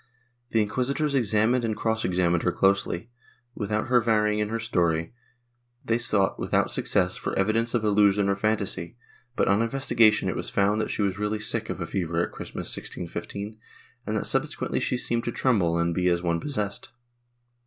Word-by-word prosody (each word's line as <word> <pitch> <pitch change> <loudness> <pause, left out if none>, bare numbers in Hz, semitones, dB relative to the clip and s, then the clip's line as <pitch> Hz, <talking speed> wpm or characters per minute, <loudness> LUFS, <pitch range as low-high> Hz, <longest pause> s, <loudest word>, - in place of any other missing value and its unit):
The 110 -1 +3
inquisitors 130 +8 -1
examined 120 0 +2
and 110 -2 -1
cross 110 0 0
examined 90 -2 +1
her 90 - +1
closely, 100 +2 +1 0.4
without 105 -1 -2
her 125 -1 +4
varying 105 -2 +2
in 105 0 0
her 115 - -1
story; 85 -6 0 0.7
they 115 0 +1
sought, 105 -5 +1
without - - +1
success, 90 -2 0
for - - -3
evidence 115 +4 +1
of 115 - +1
illusion 105 -1 +3
or 100 - +2
fantasy, 100 -1 -2 0.4
but, - - +1
on 100 +2 +3
investigation 115 -3 +3
it - - -1
was - - -4
found 105 +2 +2
that - - -2
she 105 - -1
was 100 0 -1
really 105 +1 -1
sick 110 +1 -2
of - - -4
a 85 - -2
fever 85 -2 -2
at - - -11
Christmas, - - -5
1615, 105 +2 -6 0.5
and - - 0
that - - -2
subsequently - - -1
she 125 - 0
seemed 120 -1 -1
to 120 - -1
tremble 100 -11 +1
and 85 0 +1
be 90 +1 +1
as 85 0 +1
one 85 -1 +1
possessed. 105 - -4
105 Hz, 180 wpm, -26 LUFS, 95-115 Hz, 0.7 s, her